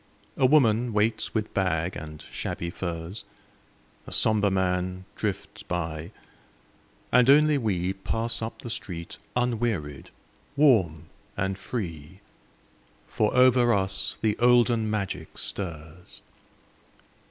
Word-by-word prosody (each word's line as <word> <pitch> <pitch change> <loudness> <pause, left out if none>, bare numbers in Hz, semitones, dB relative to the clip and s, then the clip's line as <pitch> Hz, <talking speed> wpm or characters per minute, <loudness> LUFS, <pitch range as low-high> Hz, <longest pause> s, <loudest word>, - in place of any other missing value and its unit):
A 130 - +4
woman 120 -5 +3
waits 110 +3 0
with 110 -1 -2
bag 90 -2 0
and 75 0 -8
shabby 85 0 -4
furs, 85 +2 -5 0.8
A - - -8
somber 105 -2 +3
man 95 -1 -1
drifts - - -4
by, 80 -2 -4 1.0
and 125 +1 +5
only 150 +2 +6
we 95 -5 -1
Pass 115 +4 -2
up 110 0 -6
the 120 - -5
street 85 -6 -5 0.2
unwearied, 115 - -1 0.5
warm 95 - +3 0.3
and 95 0 -1
free, 90 - -6 0.9
For 105 - 0
over 125 -2 +5
us 95 0 -1
the 110 -2 +1
olden 120 -2 +4
magic 95 -6 -4
stirs. 85 -2 -5
100 Hz, 110 wpm, -26 LUFS, 90-115 Hz, 1.0 s, only